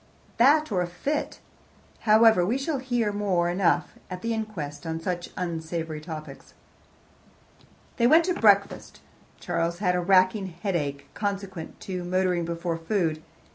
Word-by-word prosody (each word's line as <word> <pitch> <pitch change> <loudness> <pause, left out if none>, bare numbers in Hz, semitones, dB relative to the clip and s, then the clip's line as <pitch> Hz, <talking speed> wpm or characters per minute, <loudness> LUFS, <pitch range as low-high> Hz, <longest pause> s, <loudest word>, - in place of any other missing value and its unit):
"That 290 +4 +4
or 185 -3 +1
a 175 - -1
fit. 280 +13 -3 0.7
However, 220 -3 +6
we 220 +9 +1
shall 275 +1 -2
hear 245 -5 0
more 195 -4 0
than 175 +2 -2
enough 175 -2 +2 0.2
at 180 -1 -7
the 230 0 0
inquest 205 -10 -5
on 160 0 -3
such 175 +1 -3
unsavoury 165 -2 -4
topics." 155 -1 -9 1.4
They 235 - +4
went 320 +5 +5
into 365 - -1
breakfast. 200 -2 +2 0.4
Charles 170 +1 -1
had 180 -1 +1
a 180 - 0
racking 185 +2 +3 0.2
headache, 145 -8 -2
consequent 195 -4 -5
on 180 -2 -4
motoring 180 -2 +1
before 170 0 -3
food. 165 -2 -1
185 Hz, 140 wpm, -26 LUFS, 170-215 Hz, 1.4 s, However